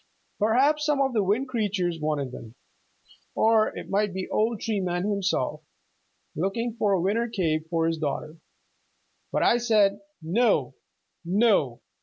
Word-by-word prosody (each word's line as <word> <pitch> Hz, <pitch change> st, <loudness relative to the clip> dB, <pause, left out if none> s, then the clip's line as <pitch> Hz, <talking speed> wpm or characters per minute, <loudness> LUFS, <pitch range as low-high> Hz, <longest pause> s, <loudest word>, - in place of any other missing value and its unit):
Perhaps 265 Hz, +8 st, +3 dB
some 300 Hz, -2 st, +1 dB
of 270 Hz, -2 st, +1 dB
the 220 Hz, -, +2 dB
Wind 210 Hz, +8 st, 0 dB
Creatures 200 Hz, -8 st, -1 dB
wanted 150 Hz, -4 st, -2 dB
them, 115 Hz, -2 st, -10 dB, 0.8 s
or 220 Hz, -1 st, +4 dB
it -, -, -7 dB
might 200 Hz, -1 st, 0 dB
be 190 Hz, -1 st, -3 dB
old 220 Hz, 0 st, 0 dB
Tree 220 Hz, -3 st, -1 dB
Man 175 Hz, -1 st, -2 dB
himself, 195 Hz, -6 st, -1 dB, 0.7 s
looking 220 Hz, +8 st, -2 dB
for 205 Hz, -2 st, +2 dB
a 190 Hz, -, +2 dB
winter 210 Hz, +7 st, 0 dB
cape 160 Hz, -7 st, -1 dB
for 165 Hz, -1 st, 0 dB
his 165 Hz, -1 st, -1 dB
daughter. 155 Hz, +1 st, -4 dB, 0.9 s
But -, -, 0 dB
I 240 Hz, -, +4 dB
said, 210 Hz, -4 st, +3 dB, 0.2 s
'No, 215 Hz, +10 st, +1 dB, 0.5 s
no. 180 Hz, -, +2 dB
200 Hz, 145 wpm, -26 LUFS, 165-225 Hz, 0.9 s, or